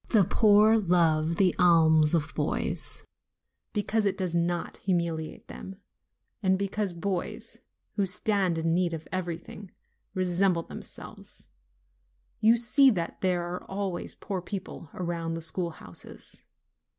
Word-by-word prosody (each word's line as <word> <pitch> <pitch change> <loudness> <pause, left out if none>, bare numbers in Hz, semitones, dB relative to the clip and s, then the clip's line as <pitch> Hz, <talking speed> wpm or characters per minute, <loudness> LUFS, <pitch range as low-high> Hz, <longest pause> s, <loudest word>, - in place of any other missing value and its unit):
The 215 -4 +5
poor 215 +3 +5
love 165 -4 +2
the 185 0 +3
alms 160 -3 +5
of 150 -2 -1
boys, - - 0 0.7
because 210 0 0
it 195 -1 -1
does 185 -3 -2
not 170 0 -1
humiliate 170 -4 -2
them, 190 - -8 0.7
and 190 -2 +3
because 200 0 -2
boys, 175 +1 -4 0.4
who 200 -2 +2
stand 185 -2 +2
in 165 0 +1
need 175 -1 +1
of 160 -1 -9
everything, 185 +2 -5 0.5
resemble 185 -1 +1
themselves: - - -10 0.9
you 225 +2 +5
see 265 +4 +5
that 175 -8 -2
there 180 -2 +1
are 175 +1 -5
always 195 -2 -4
poor 190 -3 -4
people 185 -4 -7
around 170 -2 -3
the 165 - -5
schoolhouses. 165 - -6
180 Hz, 125 wpm, -28 LUFS, 170-200 Hz, 0.9 s, The